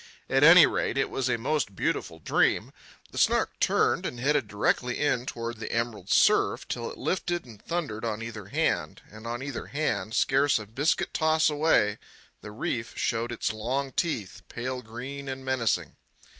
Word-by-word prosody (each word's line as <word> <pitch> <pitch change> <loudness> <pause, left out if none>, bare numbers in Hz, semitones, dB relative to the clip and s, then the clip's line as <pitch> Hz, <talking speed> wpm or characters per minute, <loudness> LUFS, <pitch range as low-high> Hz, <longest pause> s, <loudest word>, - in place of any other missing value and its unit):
At 135 +1 +4
any 165 +1 +10
rate, - - -1
it 135 - 0
was 130 -1 -1
a 120 - +1
most 125 -4 -1
beautiful 80 - -2
dream. 80 - +1 0.4
The - - -4
Snark - - +2
turned - - +2
and 120 - -4
headed 140 -1 +1
directly 120 +4 0
in 130 -4 +1
toward 115 -1 -4
the - - -5
emerald 115 -5 -2
surf, - - +3
till - - -3
it - - -9
lifted 175 -3 -2
and 110 -4 -14
thundered 155 -11 -3
on 110 -1 -2
either 110 -4 -7
hand; - - -1
and 110 +2 -10
on 120 +2 -4
either 140 -3 -5
hand, 140 -6 -2
scarce 140 +3 +3
a 105 - -6
biscuit 130 +9 0
toss 155 0 +3
away, 145 -9 +2 0.4
the - - -9
reef 115 +2 -3
showed 115 +2 -1
its 115 -1 -2
long 130 +5 -2
teeth, 125 - -2
pale 125 +1 -4
green 130 +5 -7
and 130 0 -6
menacing. 115 - 0
125 Hz, 170 wpm, -27 LUFS, 110-140 Hz, 0.4 s, any